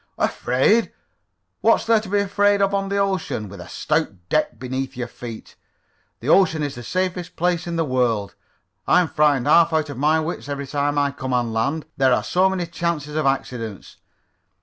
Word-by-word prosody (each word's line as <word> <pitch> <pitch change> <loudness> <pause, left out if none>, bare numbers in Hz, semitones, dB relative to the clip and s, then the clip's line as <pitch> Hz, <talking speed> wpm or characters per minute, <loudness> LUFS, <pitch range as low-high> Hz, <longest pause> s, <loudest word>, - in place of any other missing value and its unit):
"Afraid? 135 - +2 0.7
What's - - +3
there 225 -1 +4
to 215 -2 -9
be 205 - +1
afraid 200 0 +2
of 200 0 +2
on 195 0 -1
the 200 - -1
ocean, 190 - -1
with 100 +1 -10
a - - -11
stout - - 0 0.2
deck 155 0 0
beneath 130 +1 -4
your 120 -1 -3
feet? 115 -2 -10 0.7
The 120 - -7
ocean 160 -2 +4
is 145 -2 -2
the 120 - -8
safest 180 +7 -3
place 175 0 0
in 170 - -3
the 165 -1 +1
world. 120 -6 0 0.5
I'm 180 -2 +4
frightened 145 -5 +2
half 170 -1 +5
out 155 -2 0
of 135 - -8
my 155 +3 +3
wits 160 -2 -4
every 140 0 -3
time 145 +1 -1
I 140 -1 +2
come 130 -2 -5
on 120 -2 0
land. 140 +8 -1
There 130 -1 +4
are - - +1
so 185 +2 +2
many 185 -2 -2
chances 165 -3 -3
of 155 -2 +1
accidents. 115 -6 -3
150 Hz, 190 wpm, -22 LUFS, 130-180 Hz, 0.7 s, half